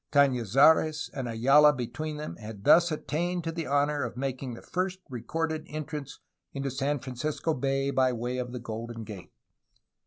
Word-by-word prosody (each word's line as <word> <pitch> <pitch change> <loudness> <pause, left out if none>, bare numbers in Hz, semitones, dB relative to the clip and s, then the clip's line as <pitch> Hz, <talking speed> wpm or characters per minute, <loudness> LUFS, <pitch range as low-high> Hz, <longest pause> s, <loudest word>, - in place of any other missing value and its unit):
Cafiizares 140 +4 +4
and 130 -4 -4
Ayala 135 +6 +6
between 145 +5 -4
them 150 +1 -6
had 105 -2 -9
thus 170 +6 +6
attained 175 +3 -2
to 165 - -2
the 165 -1 -4
honor 145 +1 +1
of 120 -2 -4
making 130 -2 -3
the - - -11
first 185 +1 -2
recorded 155 +5 -2
en 155 0 -4
trance 150 -3 -6 0.4
into 135 -1 -3
San 140 +3 0
Francisco 140 +5 -2
Bay 135 0 0
by 130 -2 +3
way 125 +1 -3
of 125 -1 -4
the 125 - -5
Golden 115 0 -6
Gate. 105 -4 -9
140 Hz, 165 wpm, -28 LUFS, 125-155 Hz, 0.4 s, Ayala